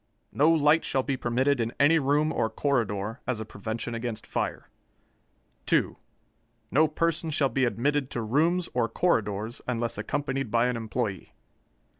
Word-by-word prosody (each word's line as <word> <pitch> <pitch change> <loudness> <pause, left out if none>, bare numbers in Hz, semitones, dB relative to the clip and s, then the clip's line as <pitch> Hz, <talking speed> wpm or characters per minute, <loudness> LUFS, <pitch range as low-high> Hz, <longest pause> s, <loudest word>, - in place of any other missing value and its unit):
No 150 +3 +3
light 160 0 +4
shall 135 - 0
be 140 0 -1
permitted 130 +3 +1
in 115 +1 -2
any 160 +3 +5
room 145 +2 +1
or 110 - 0
corridor, 110 -3 -1
as 125 -4 -1
a 110 - -4
prevention 110 +3 -5
against 115 -2 -4
fire. - - -3 1.0
2. - - +2 0.8
No 155 +4 +4
person 165 +1 0
shall 145 -3 +2
be 130 +2 +1
admitted 135 +3 0
to 120 - -3
rooms 165 +10 +1
or 120 -2 +1
corridors 110 - 0
unless 120 -3 -2
accompanied 135 +2 -2
by 115 +2 +2
an 125 - -1
employee. 110 -4 -3
125 Hz, 150 wpm, -27 LUFS, 115-145 Hz, 1.0 s, any